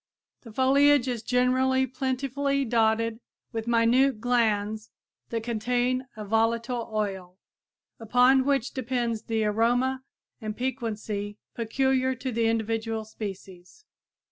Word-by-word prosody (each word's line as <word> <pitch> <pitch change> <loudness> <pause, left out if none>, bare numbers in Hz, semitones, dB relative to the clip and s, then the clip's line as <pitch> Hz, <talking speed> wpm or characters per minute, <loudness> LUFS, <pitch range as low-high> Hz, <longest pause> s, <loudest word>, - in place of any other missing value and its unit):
The 230 - -12
foliage 275 +2 +4
is 245 -3 -2
generally 255 +2 +2
plentifully 275 +2 -1
dotted 225 -1 +1 0.3
with 225 -1 -4
minute 235 +2 +3
glands 220 -3 0 0.4
that 230 -1 -3
contain 245 +3 0
a 215 - -6
volatile 230 +3 0
oil, 190 -4 -3 0.6
upon 250 +4 +4
which 275 -2 0
depends 240 -3 -2
the 225 -1 -1
aroma 245 +5 +1 0.4
and 215 -1 -5
piquancy 220 -5 -3 0.2
peculiar 260 +3 0
to 255 +1 -4
the 230 -1 +1
individual 225 0 -1
species. 195 - -9
235 Hz, 110 wpm, -27 LUFS, 220-260 Hz, 0.6 s, foliage